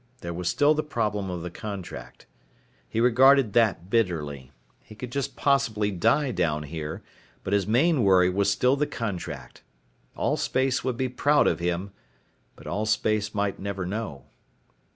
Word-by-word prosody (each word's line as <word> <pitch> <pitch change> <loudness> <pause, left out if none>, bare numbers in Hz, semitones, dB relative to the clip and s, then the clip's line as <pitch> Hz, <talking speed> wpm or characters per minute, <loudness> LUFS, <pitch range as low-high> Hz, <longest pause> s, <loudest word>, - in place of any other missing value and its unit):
There 85 0 -5
was 90 +1 -2
still 145 +1 +4
the 155 - 0
problem 105 -9 -2
of 90 -2 -4
the 90 - -5
contract. 90 -13 -8 0.6
He 110 - -2
regarded 125 -1 +5
that 100 -6 +2
bitterly. 75 - -1 0.3
He 110 - -15
could 125 +2 -7
just 140 -1 -3
possibly 115 -7 +1
die 115 - +2
down 80 -7 0
here, 75 +1 -6 0.4
but 95 - -2
his 100 -2 +1
main 135 +5 +3
worry 95 -2 +5
was 100 +2 +1
still 125 +6 +3
the 145 +1 0
contract. 100 -7 -6 0.6
Allspace 130 0 0
would 130 -2 -2
be 130 - 0
proud 145 +4 +2
of - - +1
him 90 +3 -2 0.6
but - - -16
Allspace 110 +1 0
might 100 -1 -1
never 95 -1 -4
know. 90 - -5
105 Hz, 150 wpm, -26 LUFS, 90-125 Hz, 0.6 s, regarded